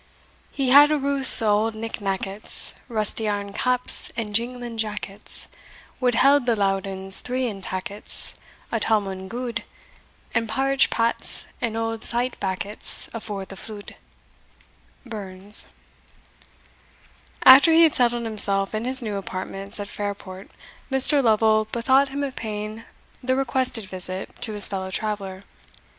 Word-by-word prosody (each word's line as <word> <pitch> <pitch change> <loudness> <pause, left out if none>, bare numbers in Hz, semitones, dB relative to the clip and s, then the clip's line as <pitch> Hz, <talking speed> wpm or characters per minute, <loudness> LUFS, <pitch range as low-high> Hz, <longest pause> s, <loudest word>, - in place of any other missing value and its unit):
He 265 -2 -1
had 290 +2 +8
a 305 - +1
routh 275 -3 -3
o' - - +1
auld 215 +2 +1
nick 225 0 -6
nackets, 195 +1 -1 0.2
Rusty 220 -1 0
airn 200 -1 -3
caps, 250 +2 +2
and 215 -3 -4
jinglin 240 0 -2
jackets, 210 -2 -4 0.5
Would 245 -3 +1
held 275 +1 +4
the 235 - +3
Loudons 195 -1 +3
three 255 +1 -2
in 205 -5 -5
tackets, 190 +2 -1 0.4
A 230 - 0
towmond 195 -4 -1
gude; 235 0 -4 0.7
And 230 -1 -1
parritch 270 +4 +1
pats, 230 0 -1 0.2
and 225 -1 -2
auld 225 0 -3
sayt 245 +2 0
backets, 195 +2 -3
Afore 200 -3 -6
the 195 - -11
flude. 205 +1 -10 1.1
Burns. 200 -3 -4 1.8
After 270 +5 +9
he 330 +1 +6
had 320 - +4
settled 240 -1 +1
himself 200 -3 +5
in 215 +2 -3
his 260 0 +2
new 210 -3 -3
apartments 195 +2 -6
at 205 - -5
Fairport, 200 -2 -7 0.4
Mr. 270 +2 +5
Lovel 215 -1 +3
bethought 265 +4 +2
him 280 +1 -4
of 275 -2 -4
paying 215 +1 -6 0.4
the 260 0 0
requested 260 -4 -1
visit 185 0 -3
to 230 -3 -1
his 205 -1 +8
fellow 190 -1 -4
traveller. 195 -1 -4
220 Hz, 135 wpm, -23 LUFS, 200-250 Hz, 1.8 s, After